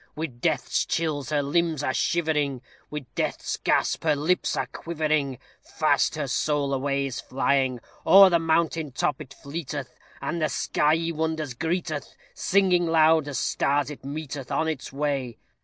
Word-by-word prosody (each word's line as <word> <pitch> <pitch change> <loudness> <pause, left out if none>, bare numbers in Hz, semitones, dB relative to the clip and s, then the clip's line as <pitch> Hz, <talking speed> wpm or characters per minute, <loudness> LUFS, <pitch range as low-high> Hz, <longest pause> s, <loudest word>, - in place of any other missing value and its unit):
With 140 -6 -5
death's - - +1
chills 150 -5 -2
her 145 -1 +1
limbs 160 0 0
are 130 - 0
shivering, 150 -7 0 0.3
With 150 -3 -5
death's - - -2
gasp - - +1
the - - +2
lips 160 +6 0
are - - 0
quivering, 155 -5 -2 0.2
Fast - - +1
her - - -2
soul 145 -2 0
away 140 +1 0
is 135 -2 -4
flying. 130 -1 0 0.2
O'er 195 -1 +8
the 170 - +4
mountain 165 -2 +1
top 145 +2 -1
it 135 -4 -10
fleeteth, 145 -2 -6 0.2
And 160 +5 -3
the 155 - +2
skyey 160 +3 +1
wonders 160 -3 -2
greeteth, 160 0 -3 0.2
Singing 180 -3 +2
loud 160 -1 +4
as 145 - -3
stars 145 +1 0
it 145 - -10
meeteth 140 -2 -6
On 160 - +1
its 155 -4 -4
way. 135 -4 -2
150 Hz, 155 wpm, -25 LUFS, 140-160 Hz, 0.3 s, O'er